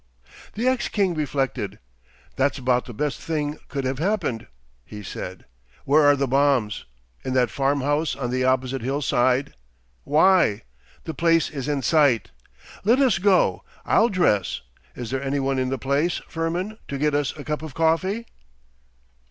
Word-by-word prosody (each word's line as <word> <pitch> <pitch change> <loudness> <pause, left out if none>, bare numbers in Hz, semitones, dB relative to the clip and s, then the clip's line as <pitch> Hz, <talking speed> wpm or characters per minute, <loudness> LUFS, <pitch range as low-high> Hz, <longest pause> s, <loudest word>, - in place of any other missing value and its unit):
The 230 +4 -1
ex 255 -1 +1
king 195 -4 +1
reflected. 140 -6 -2 0.6
'That's 140 +1 +1
about 125 -1 +1
the - - -8
best 150 +4 -2
thing 150 -3 -2
that 150 - -14
could 140 -1 -4
have 130 0 -2
happened,' 170 - -1 0.4
he 105 +7 -10
said. 95 -1 -7 0.4
'Where 150 +3 +5
are 145 -1 +6
the 140 0 0
bombs? 135 -5 +1 0.4
In 130 - -3
that 125 -2 +2
farm 140 +1 0
house 145 +3 0
on 125 -3 -3
the 130 0 0
opposite 130 0 +1
hill 135 +5 -2
side! 130 +2 +1 0.5
Why! 155 - +3 0.4
the 160 - -5
place 165 0 +2
is 140 -3 -5
in 145 -2 -1
sight! 130 - +3 0.5
Let 230 +5 +4
us 265 -3 +3
go. 195 0 +3 0.2
I'll 230 - +4
dress. 105 - +1 0.3
Is 120 -1 -6
there 135 -1 -1
any 140 +1 -1
one 135 0 0
in 130 0 0
the 135 - -1
place, 140 +7 0
Firmin, 175 +7 -3
to 140 - -4
get 150 +1 +1
us 145 0 -1
a 145 - -7
cup 150 +1 -3
of 155 -4 -8
coffee? 185 +8 +1
145 Hz, 170 wpm, -23 LUFS, 130-165 Hz, 0.6 s, are